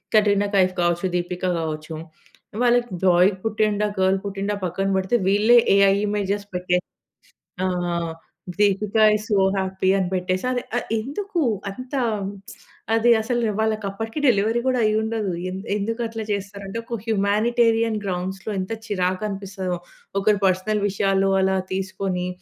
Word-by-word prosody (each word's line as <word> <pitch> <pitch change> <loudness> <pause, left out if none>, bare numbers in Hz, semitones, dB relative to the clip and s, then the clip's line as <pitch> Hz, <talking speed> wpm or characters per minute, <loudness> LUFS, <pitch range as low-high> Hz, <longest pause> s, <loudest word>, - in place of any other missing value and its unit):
Katrina 205 -1 +4
Kaif 185 -1 +3
కావచ్చు, 175 +1 +1
దీపిక 175 +1 -3 0.2
గావచ్చు 155 0 -4 0.7
వాళ్ళకి 240 -1 +3
బాయ్ 180 +1 +5
పుట్టిండా 210 -1 +1
గాల్ 190 +1 +3
పుట్టిండా 200 +1 -3
పక్కన 195 +2 -1
పెడితే. 190 +5 +1
వీళ్ళే 215 +5 +5 0.2
ఏఐ 200 -1 +5
ఇమేజెస్ 205 0 -1
పెట్టేసి 180 0 0 0.8
ఆహ్, 175 -2 -1 0.5
దీపిక 205 +1 +1 0.2
ఈస్ 215 +1 -4
సో 205 - +3 0.2
హ్యాపీ 190 0 0
అని 185 -2 0
పెట్టేసి 185 +3 -1
అది 245 -1 -1
ఆహ్, - - -2
ఎందుకు? 340 - -3 0.3
అంత 255 +6 -10 1.0
అది 235 +1 +4
అసలు 240 +1 -1 0.2
వాళ్ళకి 220 -1 0
అప్పటికి 225 +7 -5
డెలివరీ 225 +1 +3
గూడా 255 -1 +2
అయ్యుండదు. 215 -2 0 0.2
ఎం - - -5 0.2
ఎందుకు 225 +3 -2
అట్లా 225 -1 -5
చేస్తారు 200 0 -4
అంటే 195 - -5
ఒక 235 0 -4
హ్యుమానిటేరియన్ 225 +2 +2
గ్రౌండ్స్‌లో 190 +2 -3
ఎంత 185 +4 -4 0.2
చిరాకనిపిస్తదో 190 -1 -2 0.4
ఒకరి 205 +1 +3
పర్సనల్ 190 +3 +1
విషయాలు 195 0 +1
అలా 190 0 +2 0.2
తీసుకొని. 190 -1 -2
200 Hz, 130 wpm, -23 LUFS, 185-220 Hz, 1.0 s, బాయ్